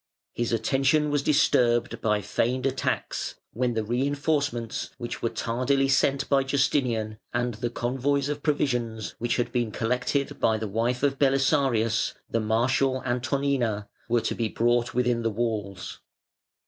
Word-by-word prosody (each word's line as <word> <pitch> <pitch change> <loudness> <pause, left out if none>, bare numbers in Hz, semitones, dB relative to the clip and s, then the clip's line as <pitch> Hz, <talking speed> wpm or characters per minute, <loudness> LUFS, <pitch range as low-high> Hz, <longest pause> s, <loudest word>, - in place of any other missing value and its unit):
His 120 -1 -2
attention 135 +6 +2
was 145 -1 +1
disturbed 125 -5 +2
by 105 -1 +1
feigned 120 +5 0
attacks, 135 -1 -2 0.2
when 120 +1 0
the 110 - 0
reinforcements, 140 0 -1
which 120 -2 -5
were 115 - +1
tardily 130 +5 0
sent 135 0 +2
by 140 -1 +3
Justinian, 125 -6 0 0.2
and 120 0 0
the 120 +3 -3
convoys 135 +4 0
of 145 0 -3
provisions, 120 - -1
which 120 0 0
had 120 -1 -1
been 120 -3 0
collected 125 +5 -1
by 110 -1 +2
the 110 0 -3
wife 115 +5 -1
of 135 -1 +1
Belisarius, 135 -5 +2
the 115 - 0
martial 130 +4 +1
Antonina, 125 -4 0 0.2
were 120 0 +3
to 115 - -1
be 115 -2 -1
brought 120 +1 +1
within 125 -1 +1
the 115 - +1
walls. 105 -4 -3
120 Hz, 145 wpm, -26 LUFS, 115-135 Hz, 0.2 s, by